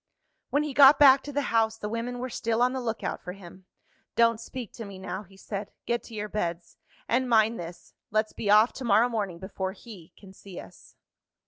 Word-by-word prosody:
When 290 +1 +1
he 300 -2 -4
got 275 +1 +8
back 275 -2 +7
to 290 - -6
the 285 0 -1
house, 225 -1 +2
the 210 - -5
women 230 +3 -4
were 250 0 -5
still 230 +1 0
on 250 +1 +2
the 260 - -3
look 225 -2 -3
out - - -3
for 180 - -7
him. 185 -1 -14 0.5
"Don't 230 -1 +3
speak 240 -2 -8
to 230 - -7
me 200 -2 -9
now," 190 0 -5
he 195 -1 -18
said. 200 +1 -6 0.2
"Get 235 0 0
to 230 - -11
your 210 0 -3
beds. 175 -4 -4 0.3
And, 250 +2 +1
mind 225 0 +3
this 170 0 -9 0.2
let's 215 0 0
be 205 - -4
off 215 +3 +6
to 265 - -7
morrow 230 +1 +4
morning 205 -7 -3
before 190 +1 -5
he 195 -5 -13
can 190 -2 -15
see 190 -2 -11
us." - - -14
220 Hz, 220 wpm, -27 LUFS, 195-240 Hz, 0.5 s, got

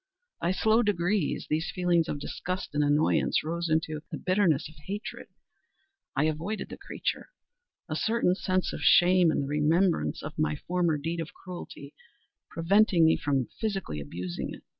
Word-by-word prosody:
By 170 - +1
slow 220 +4 +3
degrees, 200 -4 0
these 155 +3 -1
feelings 175 -3 +1
of - - -2
disgust 180 +5 -4
and 150 0 +2
annoyance 145 +2 +2
rose 170 +2 -2
into 155 -1 0
the - - -3
bitterness 185 -6 +2
of 155 - -14
hatred. 205 +3 -6 0.9
I 140 - +2
avoided 160 +8 -2
the - - -8
creature; - - -4 0.6
a - - -3
certain 225 -5 +2
sense 185 -1 -1
of - - -5
shame, 180 -1 +6
and 155 - +1
the - - -4
remembrance 160 +5 +1
of 155 0 -7
my 155 0 +1
former 170 0 0
deed 165 +4 -3
of 160 -1 -6
cruelty, 180 -2 -9 0.6
preventing 180 0 +4
me 160 - +5
from 135 -3 0
physically 195 - -2
abusing 85 +5 -5
it. - - -16
170 Hz, 160 wpm, -28 LUFS, 150-185 Hz, 0.9 s, shame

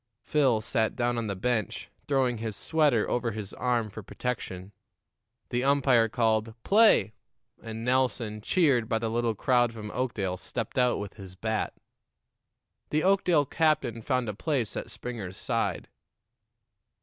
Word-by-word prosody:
Phil 130 -7 +2
sat 110 0 0
down 120 -1 0
on 115 - -3
the 100 - -2
bench, 110 0 -2 0.2
throwing 130 -4 +1
his 110 -2 -4
sweater 150 -7 +2
over 120 -1 0
his 105 -2 -6
arm 120 -3 0
for 105 +1 -8
protection. 100 -4 -5 0.8
The 125 0 0
umpire 135 -5 +4
called, 110 -1 +1
"Play," 210 - +5 0.5
and 115 0 -6
Nelson, 125 -4 0
cheered 135 - +2
by 115 - +2
the 110 0 -2
little 115 -1 0
crowd 120 +2 +2
from 105 -2 -7
Oakdale, 105 -7 -2
stepped 115 +5 -4
out 125 -1 +3
with 100 +1 -7
his 95 -3 -10
bat. 110 +3 -2 1.1
The 155 +1 +1
Oakdale 180 -6 +3
captain 135 -7 +1
found 125 0 0
a 105 - -2
place 125 - -1
at - - -5
Springer's 105 -7 -6
side. - - -1
115 Hz, 145 wpm, -28 LUFS, 110-130 Hz, 1.1 s, Play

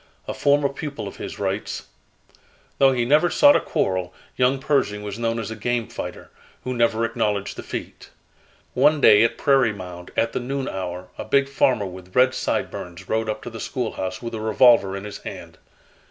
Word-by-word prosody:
A - - -3
former 145 0 +3
pupil 140 -5 -6
of 100 - -9
his - - -7
writes: - - -3 1.0
"Though 135 -1 +6
he 120 -2 0
never 150 +7 +4
sought 290 +8 +6
a - - +5
quarrel, 95 -1 -1 0.2
young 130 +2 +2
Pershing 135 -7 0
was 105 +1 -6
known 115 0 0
as 110 -1 -4
'a - - -4
game 120 +1 -1
fighter,' - - -7 0.3
who 125 - -3
never 115 -1 +2
acknowledged 105 -4 -1
defeat. - - -7 0.6
One 150 +4 +4
day, 105 -6 +7
at 115 - +1
Prairie 135 -5 +3
Mound, 90 -2 -9
at 115 0 +1
the - - -1
noon 135 +2 -3
hour 90 -1 -5
a - - -3
big 140 +4 +2
farmer 130 -5 +2
with 95 0 -10
red 130 +1 +5
sideburns 90 -6 -3
rode 110 0 -1
up 110 - -4
to 120 - -7
the 115 - -8
schoolhouse 110 -3 -4
with 115 0 -5
a 110 - -4
revolver 110 -3 +4
in 100 - -7
his 105 -1 -7
hand. - - -9
115 Hz, 185 wpm, -23 LUFS, 100-130 Hz, 1.0 s, day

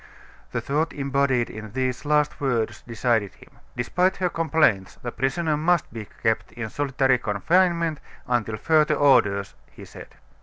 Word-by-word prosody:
The - - -2
thought 155 +4 -1
embodied 140 -3 0
in 110 -1 -9
these 130 +1 -2
last 150 0 +1
words 115 -5 -1
decided 115 -3 0
him. - - -18 0.3
"Despite 180 +10 +1
her 180 -1 0
complaints 160 - +1
the 120 - -3
prisoner 150 +6 -1
must 165 -2 +1
be 110 -3 -7 0.2
kept 110 0 0
in 115 -3 -6
solitary 135 -2 +1
confinement 165 - +1 0.3
until 110 -3 -1
further 155 +4 +3
orders," 110 -9 +3 0.2
he - - -13
said. - - -13
135 Hz, 145 wpm, -24 LUFS, 115-155 Hz, 0.3 s, further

